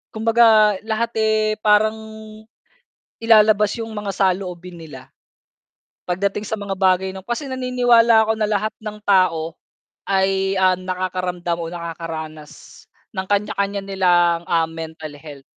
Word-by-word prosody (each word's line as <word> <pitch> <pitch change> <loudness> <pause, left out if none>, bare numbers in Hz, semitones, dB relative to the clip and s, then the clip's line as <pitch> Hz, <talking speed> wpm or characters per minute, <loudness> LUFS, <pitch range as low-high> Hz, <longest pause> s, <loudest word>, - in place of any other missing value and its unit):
kumbaga 220 -2 +4
lahat 230 +1 -1
eh, 215 0 +1
parang 215 +1 +3 1.3
ilalabas 215 -2 +5
yung 225 -1 -6
mga 205 -1 -4
saloobin 180 -2 -2
nila, 135 -5 -11 1.0
pagdating 200 +3 -2
sa 220 - -3
mga 195 -1 -4
bagay 190 0 +2
nung 190 0 -10
kasi 265 +4 -4
naniniwala 245 -3 +3
ako - - +5
na 215 - +1
lahat 215 +1 -1
ng 210 -1 -8
tao, 170 -4 +2 0.5
ay, 195 0 +1
ah, 185 -1 +3
nakakaramdam 180 -1 -3
o 165 - -4
nakakaranas 165 -3 -8 0.3
ng 190 -2 -4
kanya-kanya 200 -1 -1
nilang, 175 -3 +2
ah, 165 -1 +2
mental 160 -2 -8
health. 145 -3 -11
195 Hz, 125 wpm, -20 LUFS, 175-215 Hz, 1.3 s, ilalabas